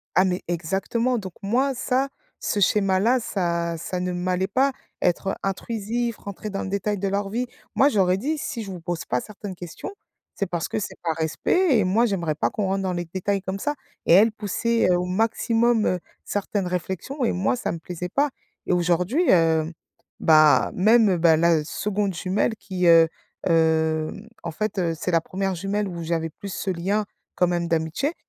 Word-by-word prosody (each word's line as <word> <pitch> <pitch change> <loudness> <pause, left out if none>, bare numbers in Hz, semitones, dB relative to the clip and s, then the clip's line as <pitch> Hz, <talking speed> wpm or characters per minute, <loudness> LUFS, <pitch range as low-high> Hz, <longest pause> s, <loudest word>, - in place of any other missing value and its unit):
ah 185 - +6
mais 180 -1 -1
exactement, 195 +9 0
donc 190 -4 -6
moi 255 +7 +1
ça, 260 +2 0 0.3
ce 205 - -1
schéma-là 200 +5 +3
ça 170 -6 -1
ça 180 +2 -3
ne 180 0 -1
m'allait 180 +1 0
pas, 265 +7 +2 0.3
être 185 +2 +1
intrusif, 225 +3 -2
rentrer 205 +1 -7
dans 195 - -3
le - - -4
détail 200 +1 -1
de 200 - -1
leur 200 +1 -1
vie. 245 +4 -2 0.3
Moi 275 - +5
je 250 - -5
leur 185 -2 +4
ai 185 - +2
dit: 300 +9 -1
«Si 240 -4 -4
je 195 - -8
vous 180 -3 -7
pose 175 -1 -3
pas 125 - 0
certaines 200 +3 -8
questions, 175 - -7 0.5
c'est 200 - -1
parce 170 -3 -3
que - - -3
c'est 210 - -4
par 165 -2 0
respect 245 - +2
et - - +3
moi 220 +6 +3
j'aimerais 175 -8 -1
pas - - 0
qu'on 210 - -2
rentre 195 0 0
dans 185 -1 -1
les 175 0 -3
détails 190 +3 -2
comme 190 +1 -4
ça». 295 - -1 0.3
Et - - +5
elle 215 +4 +7
poussait 220 0 0
au 180 0 +1
maximum, 225 +3 +2
heu, 180 - +1 0.2
certaines 205 -1 -2
réflexions 190 - -3
et - - +2
moi 190 +7 +1
ça 250 - -2
me 165 - -5
plaisait 180 +2 -6
pas. 285 +7 +1 0.4
Et - - -1
aujourd'hui, 180 - +2
heu, 165 -2 +3 0.5
bah, 155 -2 +5
même, 215 0 +5
bah, 160 -1 +5
la 165 -2 +3
2de 200 +4 -2
jumelle 190 +5 0
qui 185 -3 -3
heu 165 -1 +7 0.4
heu, 160 -1 +2 0.3
en 170 - -3
fait, 210 +5 -3
heu, 170 -2 +1
c'est 180 - -2
la 165 -1 +3
1re 190 +2 -2
jumelle 200 +3 -1
où 170 -2 -5
j'avais 165 0 -1
plus 195 +4 -8
ce 195 - -3
lien 195 +4 0 0.3
quand 180 - +3
même 175 -1 -1
d'amitié, 165 - 0
190 Hz, 195 wpm, -24 LUFS, 170-215 Hz, 0.5 s, elle